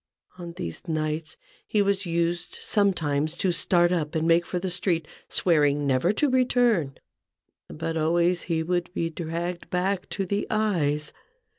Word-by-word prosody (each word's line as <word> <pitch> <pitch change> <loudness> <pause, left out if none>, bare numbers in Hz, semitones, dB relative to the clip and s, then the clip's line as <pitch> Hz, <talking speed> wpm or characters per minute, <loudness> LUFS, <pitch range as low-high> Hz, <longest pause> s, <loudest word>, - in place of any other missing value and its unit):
On 170 -1 -7
these 85 - -6
nights 155 0 -2 0.3
he 210 -1 +2
was 200 -1 0
used 170 0 -1
sometimes 155 -7 +1
to 185 +1 0
start 175 0 +2
up 160 -3 -1
and 160 +1 +1
make 170 +1 +4
for 180 - -2
the 180 +1 -2
street, 170 -3 -1 0.2
swearing 145 -4 +2
never 135 +6 +2
to 290 +8 +1
return; 245 - +2 0.7
but 165 +1 -4
always 170 +3 +2
he 160 -1 +1
would 175 +1 -1
be 165 0 -1
dragged 170 +2 -4
back 185 +1 -1
to 195 - -2
the 200 +3 -1
eyes. 160 -9 0
170 Hz, 150 wpm, -26 LUFS, 155-185 Hz, 0.7 s, make